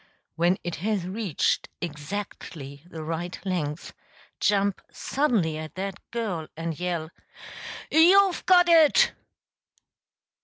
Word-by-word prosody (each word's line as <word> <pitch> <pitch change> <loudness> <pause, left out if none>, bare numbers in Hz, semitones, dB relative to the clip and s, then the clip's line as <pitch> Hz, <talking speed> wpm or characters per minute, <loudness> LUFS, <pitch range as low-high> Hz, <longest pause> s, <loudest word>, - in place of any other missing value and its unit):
When 175 +3 +2
it 175 -1 -4
has 200 0 -1
reached 190 -2 -1
exactly 150 -3 -6
the 160 -3 -7
right 165 +3 -4
length, 165 -5 -3 0.5
jump 200 -1 +1
suddenly 215 - 0
at 155 0 -8
that 195 0 -4
girl 200 -9 -3
and 165 -1 -4
yell, 170 -3 -2 0.8
"You've 370 +3 +5
got 355 -1 +6
it!") 325 -3 +6
180 Hz, 105 wpm, -26 LUFS, 160-220 Hz, 0.8 s, got